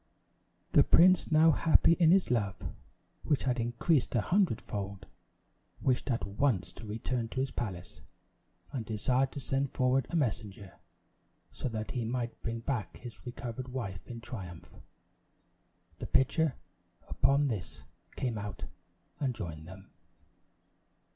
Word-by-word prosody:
The - - +7
prince 180 0 +5
now 160 +1 +7
happy 160 +2 +5
in 170 -2 +4
his 185 -5 +4
love, 100 -5 +1 0.7
which 150 - +1
had 125 -2 0
increased 120 +5 +1
a 115 - +4
hundred 180 - +2
fold, 100 -1 -5 0.7
wished 130 +1 0
at 120 -2 0
once 100 -1 0
to 110 - -10
return 115 +2 -2
to 130 - -4
his 135 0 0
palace; 95 -7 -5 0.7
and 125 -5 -3
desired 125 +5 +1
to - - -5
send 135 +1 -1
forward 130 0 +2
a - - -3
messenger, 105 - -2 0.7
so - - -4
that 110 -2 -4
he 125 - -2
might 120 0 -3
bring 115 0 -3
back 120 -3 -3
his 120 -1 -11
recovered 125 0 -5
wife 115 -8 -4
in 120 -1 -7
triumph. 95 -8 -8 1.3
The - - -5
pitcher, 140 +2 +2 0.5
upon 140 +1 +3
this, 105 -10 -4 0.3
came 120 -5 -2
out 100 -1 -6 0.6
and 130 -4 0
joined 80 -6 -6
them. 95 +2 -12
120 Hz, 135 wpm, -31 LUFS, 105-135 Hz, 1.3 s, The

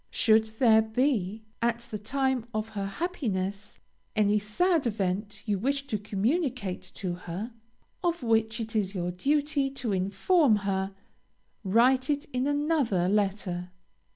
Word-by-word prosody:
Should 220 -1 +4
there 220 -3 +6
be, 220 -3 0 0.2
at 235 0 +1
the 210 - -3
time 260 +2 0
of 215 +1 -2
her 200 -2 -3
happiness, 205 - -3 0.4
any 210 0 +3
sad 290 - +1
event 200 -1 -2
you 205 -3 0
wish 275 +5 0
to 215 -6 -2
communicate 215 - -1
to 185 -3 -3
her, 180 +6 -6 0.5
of 340 -4 0
which 225 0 +1
it 225 0 -5
is 200 -2 0
your 175 -1 -1
duty 285 - +1
to 255 -5 -3
inform 200 - +3
her, 190 0 -1 0.7
write 250 +7 +3
it 290 +1 0
in 255 +2 0
another 290 - +1
letter. 190 -3 0
220 Hz, 135 wpm, -28 LUFS, 195-265 Hz, 0.7 s, there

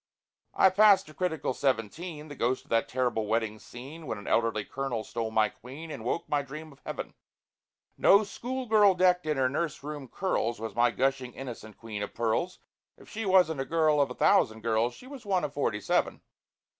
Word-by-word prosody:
I 190 - +5
pass 200 +1 +6
to 155 - -15
critical 160 -6 -1
seventeen; 150 - -2
The 145 - -8
ghost 125 +1 0
of - - -25
that 115 0 +2
terrible 120 -4 -1
wedding 110 -1 -1
scene, 140 +9 -10
When - - -3
an 100 - -10
elderly 115 -3 +1
Colonel 130 -5 -3
stole 115 0 -4
my 110 -1 +3
Queen, 140 +10 -10
And 110 - -7
woke 125 +8 -2
my 145 -1 +1
dream 150 +3 -9
of 140 - -18
heaven. - - -6 0.9
No 200 +2 +6
schoolgirl 220 -2 +2
decked 180 -2 +3
in 150 -2 0
her 130 -1 +3
nurse 150 +2 -3
room 145 -2 -6
curls 120 - -1
Was 115 0 -5
my 120 +1 +3
gushing 130 +2 -1
innocent 120 -5 -8
Queen 110 -3 -6
of 105 - -5
Pearls; 120 +11 -1 0.4
If - - -17
she 220 -1 -4
wasn't 180 -6 +4
a - - -3
girl 155 -2 +3
of 140 - +1
a 125 - -7
thousand 110 0 +3
girls, 115 +2 0
She - - -14
was 265 -2 -10
one 190 -5 0
of 145 -2 -3
forty 125 -8 -1
seven! - - 0
135 Hz, 195 wpm, -29 LUFS, 115-170 Hz, 0.9 s, pass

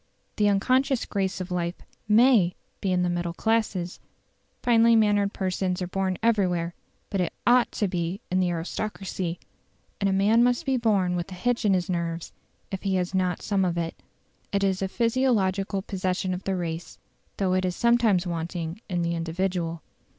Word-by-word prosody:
The 210 -1 +4
unconscious 255 +6 +2
grace 190 -2 -2
of 185 0 -5
life 175 0 -1 0.3
MAY 215 -4 +5 0.3
be 195 - 0
in 180 -1 +2
the - - +1
middle 175 -1 -2
classes: 210 -6 0 0.6
finely 230 -1 +5
mannered 205 -2 +3
persons 185 -1 -1
are 180 - -2
born 190 0 -1
everywhere; 180 -7 +1 0.4
but 195 - 0
it 175 - -1
OUGHT 245 0 +4
to 210 - 0
be 175 +1 -2
in 185 - +2
the 180 -1 +2
aristocracy: 180 0 -3 0.6
and 200 - +2
a - - +1
man 205 +5 +4
must 245 0 +2
be 270 -1 +1
born 200 -7 +2
with 175 +2 -3
a - - -6
hitch 245 +4 0
in 195 -2 +4
his 180 0 -1
nerves 170 -2 -3 0.4
if 195 - -4
he 195 -2 0
has 180 0 -1
not 185 -2 0
some 200 -2 +1
of 175 -2 0
it. 165 -1 -2 0.6
It 200 0 +1
is 190 -1 +1
a 195 - +1
physiological 205 -5 +1
possession 185 -1 -2
of 180 +1 -6
the 195 - 0
race, 170 -2 -4 0.4
though 190 -2 +1
it 185 0 +1
is 180 -1 -1
sometimes 235 -6 +3
wanting 170 +1 -4
in 175 -2 0
the 170 0 0
individual. 170 0 -2
190 Hz, 180 wpm, -26 LUFS, 175-210 Hz, 0.6 s, MAY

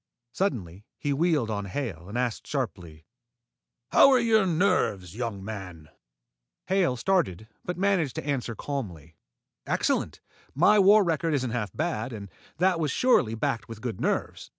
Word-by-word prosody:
Suddenly 105 - -2
he 145 - -1
wheeled 150 -6 +1
on 105 -1 -3
Hale 95 -5 -5
and 110 - -4
asked 125 -3 -2
sharply, 90 - -4 0.9
"How - - +7
are 260 -2 +5
your 220 -4 +3
nerves, 105 - +1
young 110 -5 -4
man?" 90 -8 -8 0.8
Hale 185 -9 +1
started, 115 - 0 0.2
but 180 - -4
managed 185 -8 +1
to - - -5
answer 130 -5 -2
calmly. 90 - -6 0.5
"Excellent. - - 0 0.4
My 205 +8 +5
war 205 +2 +7
record 165 -2 0
isn't 130 -4 -1
half 115 -4 -2
bad, 145 -7 -3
and 100 -3 -8 0.3
that 180 -1 +2
was 155 -2 0
surely 130 - +2
backed 115 +1 -2
with 115 -2 -8
good 120 -6 -4
nerves." - - -2
125 Hz, 150 wpm, -27 LUFS, -, 0.9 s, How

